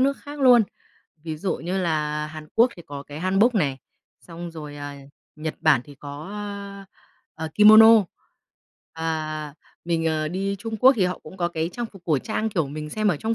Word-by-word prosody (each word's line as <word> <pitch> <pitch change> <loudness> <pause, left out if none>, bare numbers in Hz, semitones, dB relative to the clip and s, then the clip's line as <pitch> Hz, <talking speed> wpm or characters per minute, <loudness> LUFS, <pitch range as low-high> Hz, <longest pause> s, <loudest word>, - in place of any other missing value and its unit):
nước 275 +1 +2
khác 290 0 -10
luôn. 245 -3 +7 0.6
Ví 160 -1 -4
dụ 185 +5 -2
như 180 +4 -3
là 150 -3 -1
Hàn 155 0 -10
Quốc 235 +2 +5
thì 170 - -11
có 140 -1 -7
cái 145 +2 -9
Hanbok 195 +6 +3
nè, 145 -9 +1 0.4
xong 170 0 -8
rồi, 150 -3 -9
à, 145 0 -7 0.4
Nhật 155 0 -4
Bản 155 -6 +4
thì 145 - -13
có, 145 +4 -9
ơ, 200 -1 -7 0.6
ờ, - - -3
Kimono. 215 +1 +8 0.9
Ờ, 155 -2 -3 0.3
mình, 165 -1 0
ờ, 155 -1 0
đi 195 +3 -2
Trung 225 +1 -5
Quốc 260 +5 +7
thì 195 - +2
họ 180 0 -2
cũng 155 - -13
có 175 -2 0
cái 165 -1 -2
trang 240 -1 -4
phục 195 -5 -16
cổ 155 -5 +2
trang, 220 - -2
kiểu, 165 -9 -1
mình 150 +1 -6
xem 215 -1 0
ở 175 - +2
trong 220 +9 -1
170 Hz, 200 wpm, -24 LUFS, 155-210 Hz, 0.9 s, Kimono